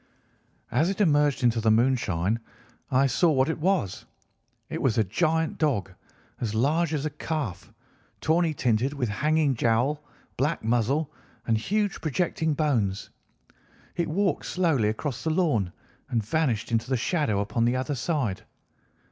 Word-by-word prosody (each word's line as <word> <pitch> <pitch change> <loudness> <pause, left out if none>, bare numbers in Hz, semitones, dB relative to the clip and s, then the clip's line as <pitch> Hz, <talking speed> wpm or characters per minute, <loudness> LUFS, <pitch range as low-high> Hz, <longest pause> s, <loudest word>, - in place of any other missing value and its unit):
As 165 +4 +2
it 195 - -3
emerged 145 -8 +3
into 120 -1 +3
the 110 - +2
moonshine 115 -4 +2 0.5
I 135 0 +3
saw 150 +6 +3
what 135 -1 +2
it 160 - -2
was. 175 - 0 0.6
It - - -4
was 125 -3 +1
a 110 - +4
giant 160 - 0
dog, 125 - 0 0.5
as 110 -3 -2
large 150 +8 +2
as 145 0 -2
a 155 - -2
calf, 145 - -4 0.5
tawny 165 +1 +2
tinted, 125 +2 +1
with 130 -5 -2
hanging 150 +6 +2
jowl, 120 +6 +1 0.3
black 145 +3 0
muzzle, 125 +7 0 0.3
and 115 - +2
huge 205 - -1
projecting 160 0 0
bones. 115 -11 0 0.8
It 170 -1 0
walked 185 0 0
slowly 160 -12 +1
across 125 +4 -4
the 160 - 0
lawn 150 - +1 0.4
and 115 -3 -1
vanished 125 -5 0
into 115 +2 0
the 130 - +2
shadow 125 - 0
upon 110 +3 0
the 120 +1 +2
other 130 +3 -1
side. 130 - -1
135 Hz, 150 wpm, -26 LUFS, 115-160 Hz, 0.8 s, a